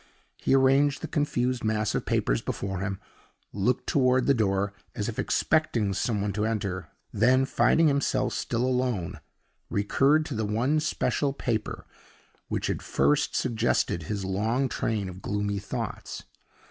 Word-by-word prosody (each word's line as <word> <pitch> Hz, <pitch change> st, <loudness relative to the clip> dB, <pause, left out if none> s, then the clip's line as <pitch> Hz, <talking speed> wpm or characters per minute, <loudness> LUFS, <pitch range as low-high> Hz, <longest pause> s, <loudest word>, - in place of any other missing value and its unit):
He -, -, +2 dB
arranged 135 Hz, +2 st, +3 dB
the -, -, -2 dB
confused 130 Hz, -5 st, 0 dB
mass 110 Hz, -1 st, 0 dB
of -, -, -2 dB
papers -, -, +1 dB
before 95 Hz, -2 st, -3 dB
him 100 Hz, 0 st, -3 dB, 0.5 s
looked 105 Hz, +5 st, 0 dB
toward 130 Hz, -2 st, +3 dB
the 140 Hz, -, +4 dB
door, 100 Hz, -4 st, 0 dB, 0.2 s
as 105 Hz, -, -2 dB
if 120 Hz, +1 st, -4 dB
expecting 120 Hz, -9 st, +1 dB
some 105 Hz, +1 st, -1 dB
one 100 Hz, 0 st, -1 dB
to 105 Hz, +2 st, -1 dB
enter 100 Hz, -6 st, -2 dB, 0.2 s
then, 130 Hz, +5 st, +4 dB
finding 160 Hz, +4 st, +3 dB
himself 140 Hz, -2 st, +1 dB
still 120 Hz, +1 st, -1 dB
alone, 120 Hz, -9 st, -1 dB, 0.5 s
recurred 135 Hz, +10 st, +2 dB
to 150 Hz, -, -5 dB
the 110 Hz, -1 st, -1 dB
one 120 Hz, +9 st, +1 dB
special 145 Hz, -2 st, 0 dB
paper 115 Hz, -5 st, -3 dB, 0.6 s
which -, -, -2 dB
had -, -, -2 dB
first 70 Hz, +2 st, +1 dB
suggested 115 Hz, -6 st, +1 dB
his 100 Hz, +3 st, -4 dB
long 110 Hz, +8 st, 0 dB
train 110 Hz, -5 st, -2 dB
of 95 Hz, +1 st, -9 dB
gloomy 100 Hz, 0 st, -2 dB
thoughts. 100 Hz, -, -5 dB
110 Hz, 145 wpm, -27 LUFS, 100-130 Hz, 0.6 s, the